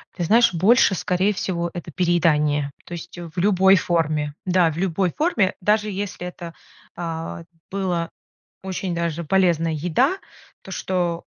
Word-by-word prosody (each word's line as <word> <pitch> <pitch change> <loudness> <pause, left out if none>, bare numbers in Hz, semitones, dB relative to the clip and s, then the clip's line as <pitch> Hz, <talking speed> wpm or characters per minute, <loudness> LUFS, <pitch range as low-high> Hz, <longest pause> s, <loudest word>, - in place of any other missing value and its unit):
Ты 175 - -3
знаешь, 230 +1 +4
больше 200 +4 +4
скорее 185 +4 +1
всего 170 -3 -2
это 175 -1 -7
переедание. 150 -4 +1
То 175 - -9
есть 170 +1 -8
в 175 0 -9
любой 190 0 +5
форме. 155 -4 0
Да, 180 -3 +3
в 155 - -8
любой 185 0 0
форме, 235 - +1
даже 210 +2 +1
если 195 -2 -4
это, 170 -2 -8 0.4
а, 165 -1 -5 0.3
было 180 -4 -1 0.5
очень 190 -1 -3
даже 170 0 -2
полезная 170 -1 +2
еда, 180 - +1 0.4
то 190 - -11
что 175 -3 -2
175 Hz, 140 wpm, -22 LUFS, 165-190 Hz, 0.5 s, любой